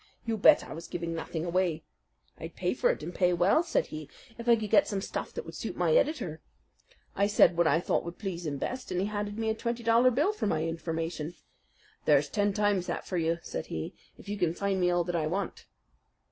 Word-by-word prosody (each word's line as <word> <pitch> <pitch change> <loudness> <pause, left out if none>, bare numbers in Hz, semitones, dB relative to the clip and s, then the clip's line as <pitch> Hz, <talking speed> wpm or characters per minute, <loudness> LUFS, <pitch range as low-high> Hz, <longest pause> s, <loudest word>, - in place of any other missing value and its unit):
You 230 -1 0
bet 210 - +6
I - - -8
was 165 +2 -8
giving 170 -1 -4
nothing 165 0 -4
away. 175 -2 0 0.6
'I'd - - -8
pay - - 0
for - - +2
it - - -1
and 175 - -5
pay 180 -1 +2
well,' 180 - +4
said 335 -1 0
he, 155 -2 -6 0.3
'if 235 +1 -4
I 235 - +8
could 215 -2 -4
get 295 - +5
some 200 - -1
stuff 195 - -4
that 475 - -4
would - - -9
suit - - -5
my - - +2
editor.' 235 - +1 0.7
I 200 - +3
said 205 -4 +5
what 170 -1 +3
I 155 +2 +4
thought - - 0
would 170 0 -7
please 180 -5 -4
him 140 -2 -2
best, 255 - -4
and 180 - 0
he 190 - +1
handed 205 0 -3
me 225 0 -1
a - - +2
twenty 235 +1 -3
dollar 230 +2 +5
bill 295 - +2
for 420 - -2
my 160 -5 0
information. 165 0 -3 0.7
'There's - - +4
ten 205 -1 +1
times 205 -3 +1
that - - -3
for 185 - -3
you,' 165 0 +1
said - - -5
he, 80 -1 -4 0.2
'if - - -15
you 205 0 -4
can 170 -2 +1
find 195 -1 0
me 180 - +3
all 175 0 +2
that 175 0 -3
I 155 -2 0
want.'" 190 +5 -3
185 Hz, 235 wpm, -29 LUFS, 165-220 Hz, 0.7 s, I